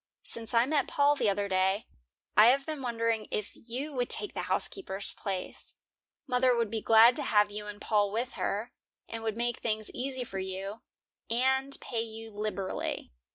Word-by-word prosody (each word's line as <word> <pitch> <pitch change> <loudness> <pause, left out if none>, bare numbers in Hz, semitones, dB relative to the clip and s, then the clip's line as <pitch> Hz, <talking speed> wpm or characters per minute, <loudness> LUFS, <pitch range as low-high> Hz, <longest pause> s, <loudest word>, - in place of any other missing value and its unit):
Since 230 0 -1
I 230 +1 +6
met 290 +1 +1
Paul 290 0 +3
the 240 -7 +2
other 200 0 0
day, 190 +2 +1 0.5
I 215 +2 +9
have 275 +3 +4
been 310 -3 -4
wondering 230 -3 0
if 210 - -3
you 260 +6 -6
would 245 -2 -1
take 415 - 0
the - - -2
housekeeper's 200 - -1
place. 190 -2 -5 0.5
Mother 250 -1 +3
would 230 -3 0
be 225 -1 -2
glad 225 +3 +7
to - - 0
have 210 -4 +3
you 210 0 -6
and 205 0 -7
Paul 205 -2 +2
with 240 +4 -2
her, 220 +5 -2 0.4
and 225 0 -6
would 220 -1 -2
make 240 0 -1
things 215 -2 -2
easy 260 0 -3
for 195 -5 -5
you, 190 +3 -5 0.5
and 265 +3 +1
pay 230 -3 -2
you 225 0 -7
liberally." 205 -2 -3
225 Hz, 180 wpm, -30 LUFS, 210-250 Hz, 0.5 s, I